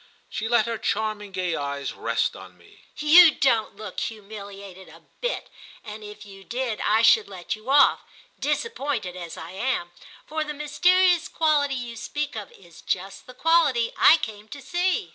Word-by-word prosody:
She 220 - -3
let 235 -2 +3
her 230 -1 -3
charming 215 -2 -2
gay 185 -2 -2
eyes 140 -1 -4
rest 115 0 -1
on 95 -1 -13
me. 85 - -21
"You 310 +2 +7
don't 230 -7 +1
look 215 +1 -7
humiliated 200 -4 -8
a 165 +1 -16 0.2
bit, - - -2 0.4
and 215 -1 -9
if 210 +1 -10
you 195 -1 -13
did 240 0 -3
I 220 +2 +2
should 220 -1 +5
let 185 +1 -5
you 215 +4 -12
off, 280 0 +5 0.4
disappointed 285 - -2
as 170 -2 -8
I 165 +2 -8
am; 190 -3 -2 0.3
for 315 0 -2
the 300 -1 -6
mysterious 355 +4 +3
quality 295 -3 +1
you 240 -2 -6
speak 295 +4 -4
of 210 -3 -7
is 175 -3 -17
just 195 +1 -4
the 255 - -12
quality 300 -7 +2
I 320 - +7
came 210 -1 -6
to 280 - -9
see." 355 +5 -1
220 Hz, 170 wpm, -24 LUFS, 195-290 Hz, 0.4 s, You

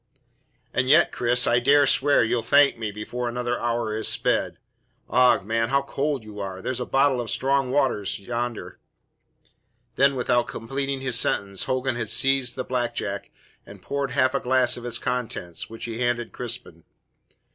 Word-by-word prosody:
"And 130 0 0
yet, 155 +4 +5
Cris, 120 +1 +2
I 120 - +3
dare 140 +3 +4
swear 140 0 +3
you'll 115 +1 0
thank 140 +5 +4
me 110 -2 -4
before 120 +4 -4
another 120 0 -2
hour 115 -2 -1
is 110 - -1
sped. - - +1 0.5
Ough, 125 -4 +4
man, 115 +2 -1
how 140 0 +2
cold 140 -2 -2
you 105 -1 -10
are! 95 -2 -5
There's 130 +6 -3
a 125 - -4
bottle 135 -2 +2
of 115 - -6
strong 135 0 0
waters 130 -7 0
yonder 120 +2 -5 0.6
" 120 0 -40
Then, 140 +1 +4
without 120 -1 +1
completing 135 +3 -4
his 130 -2 +1
sentence, 100 -1 0
Hogan 130 -1 -1
had 115 -3 -3
seized 135 +1 +2
the 130 - -3
black 120 -2 -2
jack 100 -1 -4 0.3
and - - -13
poured 140 -1 -2
half 130 0 +2
a 140 - +1
glass 125 -1 +2
of 120 0 -7
its 120 0 0
contents, 115 -10 -4
which 115 0 -7
he 115 -1 -5
handed 120 -1 -1
Crispin. 120 -9 -5
125 Hz, 175 wpm, -24 LUFS, 115-135 Hz, 0.6 s, yet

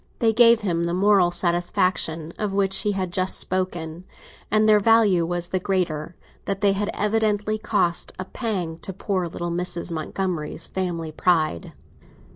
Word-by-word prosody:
They 225 -1 +2
gave 230 0 +6
him 170 -4 -1
the 170 +1 -1
moral 195 -2 +4
satisfaction 175 -2 +1
of 205 -2 -2
which 195 -1 +2
he 210 - 0
had 185 -2 -3
just 185 0 +1
spoken, 175 -2 -3 0.4
and 215 +1 +3
their 210 -1 +6
value 205 -6 +3
was 175 0 -1
the 185 - -1
greater 175 -4 -2 0.3
that 195 0 -3
they 200 -1 +4
had 205 +1 -2
evidently 215 0 0
cost 175 -5 0
a 185 - -5
pang 185 -8 -4
to 190 - -7
poor 185 -1 -2
little 170 +1 -5
Mrs. 175 0 -2
Montgomery's 165 0 -3
family 170 -4 -3
pride. 155 - 0
185 Hz, 155 wpm, -23 LUFS, 170-205 Hz, 0.4 s, gave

